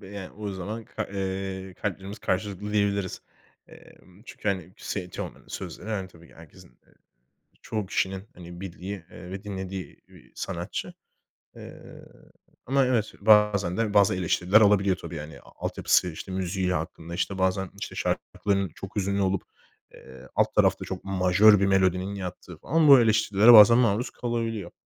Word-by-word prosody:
b 95 - -11
yani, 100 -2 -7
o 105 0 -6
zaman 105 +4 -6
ka - - -5
eee, 95 -1 -4
kalplerimiz 100 +1 -5
karşılıklı 100 +2 -3
diyebiliriz, 100 -2 0 0.5
emm, 95 +3 -18
çünkü, 105 - -5
hani, 95 -2 -2
s 90 -3 -5
Teoman'ın - - -8
sözleri, 105 - -7
hani, 95 -4 -3
tabii 85 -1 -18
ki - - -19
herkesin, 80 -3 -16 0.2
eee, - - -27 0.7
çoğu 105 -3 -3
kişinin, 95 +1 -2
hani, 85 0 -11
bildiği, 95 0 -7
ııı, 90 0 -11
ve 95 +1 -6
dinlediği 95 -2 -6
bir - - -19
sanatçı, - - -5 0.6
eee, - - -11 0.8
ama 135 +1 +2
evet, 115 -4 0
bazen 105 -3 +4
de 110 -2 0
bazı 100 0 +4
eleştiriler 90 +3 +3
alabiliyor 100 -2 +4
tabii, 85 - -8
yani, 75 0 -8
a - - -18 0.2
altyapısı, 90 - +2
işte, 85 +4 -8
müziği 95 0 -1
hakkında, 85 0 -5
işte, 90 +2 -2
bazen, 95 0 0
işte, - - -6
şarkıların 100 -2 -1
çok 95 - -9
hüzünlü 100 0 0
olup, 95 -1 0 0.5
eee, 65 0 -14
alt - - +1
tarafta - - +3
çok 95 - -6
majör 95 +2 +5
bir 100 - +2
melodinin 95 0 +1
yattığı 90 -2 -7
falan 155 - +1
bu 135 -3 +9
eleştirilere 110 0 +5
bazen 110 +1 +9
maruz 120 -1 +2
kalabiliyor. 115 -6 -3
95 Hz, 155 wpm, -26 LUFS, 90-105 Hz, 0.8 s, bu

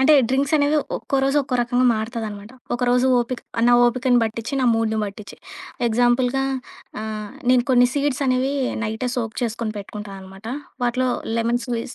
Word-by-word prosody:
అంటే 295 +3 +6
డ్రింక్స్ 275 +3 +1
అనేవి 290 +1 +2 0.2
ఒక్కో 275 - -2
రోజు 275 +2 +1
ఒక్కో 260 -1 -4
రకంగా 245 +1 +2
మారుతదన్నమాట. 220 -2 -5 0.2
ఒకరోజు 250 +1 +2
ఓపిక 240 +1 -4 0.3
నా - - +5
ఓపికని 250 0 +2
బట్టిచ్చి, 230 +3 -4
నా - - +2
మూడ్‌ని 220 -1 0
బట్టిచ్చి. 200 0 -8 0.5
ఎగ్జాంపుల్‌గా 245 +3 +2 0.6
ఆహ్, 215 -1 -5 0.2
నేను 250 -1 +4
కొన్ని 245 -1 +5
సీడ్సనేవి 275 -2 +1 0.3
నైటే 220 +4 -2
సోక్ 225 -3 -2
చేసుకొని 230 -1 -2
పెట్టుకుంటా 205 0 -8
అన్నమాట. 190 +3 -12 0.4
వాటిలో 255 +1 +1 0.3
లెమన్ 235 +1 +1
స్క్వీజ్ 240 -1 -4
240 Hz, 145 wpm, -22 LUFS, 220-255 Hz, 0.6 s, అంటే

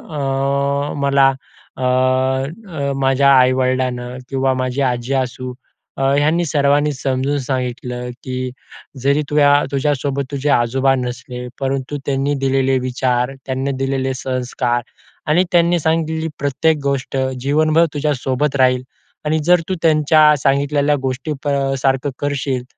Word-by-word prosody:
अ, 140 +1 -1
मला 140 -1 +4 0.5
अ, 130 - -4
अ, 130 - 0
माझ्या 135 +1 +4
आई-वडिलांनी 130 -1 +1
किंवा 135 -1 +1
माझी 130 +1 -2
आजी 120 +3 -4
असू 125 0 -6 0.4
अ, - - -3 0.2
ह्यांनी 160 +4 +2
सर्वांनी 145 0 +2
समजून 135 +2 -1
सांगितलं, 125 -1 -3
की 130 0 -4 0.5
जरी 140 +2 +3
तु 150 - -1 0.3
तुझ्यासोबत 140 0 -1
तुझे 140 +1 -2
आजोबा 135 +1 +2
नसले 125 0 -5
परंतु 135 +1 -2
त्यांनी 140 +1 0
दिलेले 135 0 +2
विचार, 125 0 0
त्यांनी 135 +1 -2
दिलेले 135 0 -1
संस्कार 125 -1 -2 0.5
आणि 175 +4 +4
त्यांनी 170 0 +3
सांगितली 160 0 0
प्रत्येक 150 +3 +1
गोष्ट 135 -1 -2 0.2
जीवनभर 155 +4 +3
तुझ्यासोबत 140 -1 -1
राहील 130 -1 +3 0.4
आणि 155 +1 +1
जर 175 -1 +5
तू 190 - 0
त्यांच्या 155 -1 +5
सांगितलेल्या 145 +1 +2
गोष्टी 135 +4 -2
प - - -4
अ, 135 -1 0
सारखं 135 +1 +1
करशील, 140 -3 -2
135 Hz, 125 wpm, -18 LUFS, 130-145 Hz, 0.5 s, जर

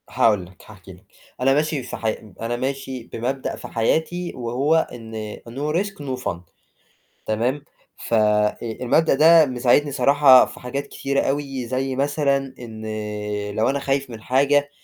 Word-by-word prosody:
هاقول 105 -5 +2
لك، 90 0 -18
هاحكي - - -13
لك، - - -19 0.4
أنا 135 +1 +4
ماشي 150 -1 0
سح 120 - -7
أب 110 -2 -3
أنا 115 +1 -2
ماشي 130 0 -4
بمبدأ 130 +3 -3
في - - -9
حياتي 160 +9 -1
وهو 130 +7 +1
إن 110 -2 -7
No 145 +5 -3
risk 200 0 -5
no 130 -3 -4
fun 85 - -2 0.9
تمام، 120 +6 -1 0.3
ف - - -6
آآ، 105 -1 +3
المبدأ 120 +7 +1
ده 160 +2 +7
مساعدني 130 +3 +2
صراحة 140 -1 +6
في - - -11
حاجات 140 +3 -4
كتيرة 140 0 -1
أوي، 135 -2 -2
زي 130 +2 -2
مثلًا 140 0 +1 0.2
إن 110 -3 -9 0.7
لو 110 - +2
أنا 140 +1 0
خايف 135 -1 -1
من 115 -2 -9
حاجة 140 +4 +2
130 Hz, 155 wpm, -22 LUFS, 115-145 Hz, 0.9 s, ده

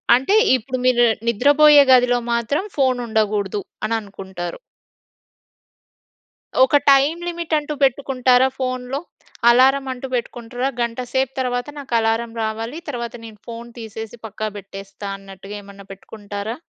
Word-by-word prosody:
అంటే, 265 +11 +1 0.2
ఇప్పుడు 255 +2 -5
మీరు 240 -1 +4 0.2
నిద్రపోయే 290 +5 +6
గదిలో 245 -1 +5
మాత్రం 235 +8 0
ఫోన్ 260 -2 +2
ఉండగూడదు 210 -2 0 0.2
అని 225 +1 0
అనుకుంటారు. 190 - -7 2.0
ఒక 265 - +3 0.2
టైమ్ 280 +5 +4
లిమిట్ 340 -2 -4
అంటూ 300 0 -3
పెట్టుకుంటారా 260 -1 +3
ఫోన్‌లో? 255 +1 -3 0.5
అలారం 265 +3 +5
అంటూ 255 +1 -7
పెట్టుకుంటరా? 245 +1 -3
గంట 235 0 -2
సేపు 265 -1 +1
తర్వాత 245 -1 -1
నాకు 270 -3 -8
అలారం 225 +1 0
రావాలి. 225 +6 -4
తర్వాత 235 -3 -5
నేను 215 -2 -12
ఫోన్ 235 0 -8
తీసేసి, 225 +1 -8
పక్కా 215 0 -4
పెట్టేస్తా 195 +1 -9
అన్నట్టుగా 195 +1 -10
ఏమన్నా 200 0 -13
పెట్టుకుంటారా? 205 +2 -7
240 Hz, 120 wpm, -20 LUFS, 215-260 Hz, 2.0 s, నిద్రపోయే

